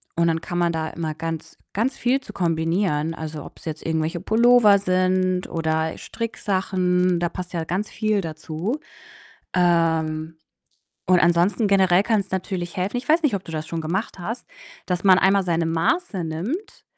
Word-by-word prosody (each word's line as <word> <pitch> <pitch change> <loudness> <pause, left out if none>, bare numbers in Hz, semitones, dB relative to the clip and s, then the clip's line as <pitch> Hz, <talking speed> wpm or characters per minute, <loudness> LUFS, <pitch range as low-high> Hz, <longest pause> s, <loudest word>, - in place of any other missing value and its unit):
und 170 0 +2
dann 165 0 +1
kann 175 - -4
man 175 -1 +2
da 160 -1 -2
immer 160 -2 -4
ganz 165 0 -6 0.2
ganz 230 +7 0
viel 250 +3 +2
zu - - -12
kombinieren. 165 -1 0
Also, 155 -2 -6
ob‘s - - -14
jetzt 155 -1 -5
irgendwelche 160 +1 -1
Pullover 225 -1 +5
sind 185 -1 +1
oder 160 -1 -1
Stricksachen, 185 -5 0
da 175 0 0
passt 180 0 -7
ja 165 - -1
ganz 185 +6 -2
viel 215 -1 0
dazu. 160 - -4 0.8
Ähm, 160 -2 +1 0.7
und 180 -1 +5
ansonsten 175 +6 +3
generell 190 -2 +4
kann‘s 205 -4 0
natürlich 185 -2 -3
helfen 190 +6 -1
ich 245 - -9
weiß 325 +2 +4
nicht, 280 -9 +2
ob 195 - -3
du 165 - -9
das 155 0 -4
schon 165 0 -4
gemacht 185 +6 -3
hast, 225 +7 -5 0.4
dass 180 -1 -1
man 190 -1 +7
einmal 195 0 +3
seine 170 -2 +1
Maße 180 - 0
nimmt, 225 - -5
180 Hz, 165 wpm, -23 LUFS, 165-200 Hz, 0.8 s, man